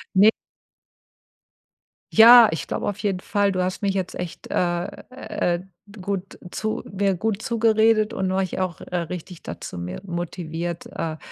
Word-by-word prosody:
Ne 200 +3 +8 1.8
Ja, 230 0 +9
ich 160 - -4
glaube - - -3
auf 205 0 -3
jeden 200 -3 -1
Fall, 200 +1 +1
du 185 -1 0
hast 185 0 -3
mich 200 -2 +1
jetzt 185 -2 -2
echt, 180 -2 -6
äh, 175 -1 0 0.2
äh, 180 -8 -2 0.4
gut 195 0 -4
zu 215 0 -3
mir 195 0 +1
gut 215 +3 -2
zugeredet 225 -2 +3
und 190 -4 -1
mich 190 -1 -1
auch, 185 -3 -2
äh, - - -7
richtig 175 0 -6
da - - -7
zu - - -7
mehr 90 - -5
motiviert, 170 -1 -4
äh, 160 -1 -4
190 Hz, 155 wpm, -23 LUFS, 175-215 Hz, 1.8 s, Ja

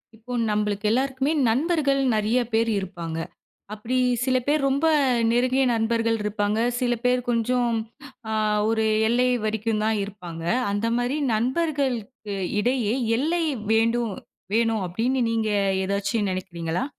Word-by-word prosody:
இப்போ 240 +3 -9 0.2
நம்மளுக்கு 210 0 -1
எல்லாருக்குமே 265 +3 0 0.2
நண்பர்கள் 280 +2 +1
நெறைய 215 +4 +1
பேர் 230 +1 +2
இருப்பாங்க. 175 -4 -6 0.6
அப்பிடி 225 +4 -3 0.3
சில 260 -1 +2
பேர் 300 +1 +2
ரொம்ப 280 +4 +1 0.4
நெருங்கிய 255 +3 +2
நண்பர்கள் 230 0 +1
இருப்பாங்க. 210 0 -1 0.2
சில 245 -1 +1
பேர் 250 0 +3
கொஞ்சம் 240 +1 +1 0.6
அ - - -1 0.4
ஒரு 220 -1 +1 0.2
எல்லை 250 +2 +2 0.2
வரைக்கும் 215 0 -1
தான் 220 0 +1
இருப்பாங்க. 180 -5 -8 0.3
அந்த 205 +3 -1
மாரி 245 +4 -1 0.2
நண்பர்களுக்கு 250 -4 -1 0.2
இடையே 235 -1 +1 0.2
எல்லை 330 +6 0 0.3
வேண்டும், 230 0 +1 0.4
வேணும் 225 -2 +1
அப்டீன்னு 240 +8 0
நீங்க 225 -1 0 0.4
ஏதாச்சும் 200 +1 -1
நினைக்கிறீங்களா? 175 +2 -3
230 Hz, 120 wpm, -24 LUFS, 210-255 Hz, 0.6 s, பேர்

